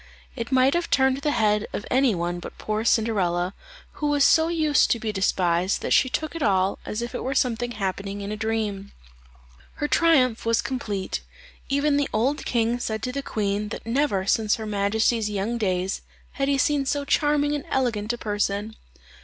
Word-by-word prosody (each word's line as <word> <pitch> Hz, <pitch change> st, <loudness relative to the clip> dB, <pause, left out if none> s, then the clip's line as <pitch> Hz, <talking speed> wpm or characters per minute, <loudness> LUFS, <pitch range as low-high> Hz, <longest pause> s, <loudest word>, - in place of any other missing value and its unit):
It 235 Hz, 0 st, -5 dB
might 260 Hz, +1 st, +4 dB
have 345 Hz, 0 st, -1 dB
turned 265 Hz, -1 st, +3 dB
the 280 Hz, +2 st, -1 dB
head 210 Hz, -5 st, +1 dB
of 205 Hz, -, -4 dB
any 255 Hz, -4 st, +3 dB
one 175 Hz, +1 st, -2 dB
but -, -, -9 dB
poor 215 Hz, 0 st, -2 dB
Cinderella, 190 Hz, -6 st, +1 dB, 0.4 s
who 300 Hz, -, -3 dB
was 290 Hz, -1 st, +3 dB
so 320 Hz, +2 st, +5 dB
used 310 Hz, -4 st, +2 dB
to 235 Hz, -, +1 dB
be 220 Hz, -1 st, -2 dB
despised, 185 Hz, -2 st, +1 dB
that -, -, +1 dB
she 260 Hz, -, +4 dB
took 315 Hz, +5 st, -3 dB
it 330 Hz, -, -5 dB
all 195 Hz, -5 st, +2 dB
as 215 Hz, +3 st, -3 dB
if 240 Hz, -, -6 dB
it -, -, -4 dB
were 265 Hz, +1 st, -2 dB
something 240 Hz, -1 st, 0 dB
happening 200 Hz, -1 st, -3 dB
in 200 Hz, +1 st, -5 dB
a -, -, -2 dB
dream. 215 Hz, -2 st, -3 dB, 0.8 s
Her 295 Hz, -, -2 dB
triumph 270 Hz, -9 st, +3 dB
was 230 Hz, 0 st, +2 dB
complete; 210 Hz, -7 st, -3 dB, 0.5 s
even 285 Hz, +1 st, +2 dB
the 285 Hz, -1 st, 0 dB
old 255 Hz, +7 st, 0 dB
king 235 Hz, 0 st, 0 dB
said 220 Hz, -2 st, -3 dB
to 250 Hz, -, -2 dB
the 280 Hz, +2 st, -3 dB
queen, 210 Hz, -4 st, -2 dB
that -, -, -7 dB
never 230 Hz, -5 st, 0 dB
since 215 Hz, +1 st, +2 dB
her 220 Hz, -, -6 dB
majesty's 215 Hz, +2 st, +1 dB
young 210 Hz, +4 st, -2 dB
days 185 Hz, -2 st, -1 dB, 0.3 s
had 275 Hz, -3 st, -2 dB
he 280 Hz, 0 st, +2 dB
seen 280 Hz, 0 st, +1 dB
so 285 Hz, 0 st, -1 dB
charming 290 Hz, 0 st, +2 dB
and 290 Hz, -2 st, -2 dB
elegant 230 Hz, -5 st, 0 dB
a 240 Hz, -, -4 dB
person. 205 Hz, 0 st, -2 dB
225 Hz, 190 wpm, -24 LUFS, 205-275 Hz, 0.8 s, so